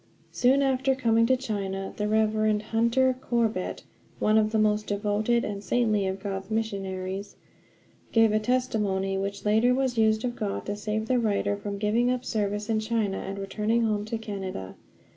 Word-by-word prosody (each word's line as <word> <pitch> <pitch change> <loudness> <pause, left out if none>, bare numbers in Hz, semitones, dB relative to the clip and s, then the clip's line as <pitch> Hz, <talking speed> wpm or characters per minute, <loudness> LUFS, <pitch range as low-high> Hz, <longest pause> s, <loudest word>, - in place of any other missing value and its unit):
Soon 265 +3 +3
after 265 0 +2
coming 230 -3 +3
to 260 +1 +3
China 195 -6 -4
the 210 - -1
Rev. 215 0 +2
Hunter 235 +4 +2
Corbett, 225 -7 -1 0.3
one 215 - +2
of 215 0 +1
the 220 - +1
most 210 0 +2
devoted 210 +3 0
and 200 -1 -5
saintly 210 -1 +1
of 190 +1 -3
God's 195 -1 -4
missionaries, 195 -3 -3 0.8
gave 225 -1 +5
a 215 - +2
testimony 215 -5 0
which 200 +1 -3
later 220 +4 +4
was 260 -3 0
used 220 +1 +3
of 240 -1 -2
God 205 -3 -3
to 205 - -3
save 215 +1 -3
the 255 0 +2
writer 205 -2 0
from 200 0 -5
giving 220 +4 +1
up 250 0 -1
service 210 -1 -1
in 220 -1 +1
China 215 -3 -1
and 195 +1 -5
returning 210 +4 0
home 210 -2 0
to 225 +1 -3
Canada. 190 - -6
215 Hz, 170 wpm, -27 LUFS, 200-230 Hz, 0.8 s, gave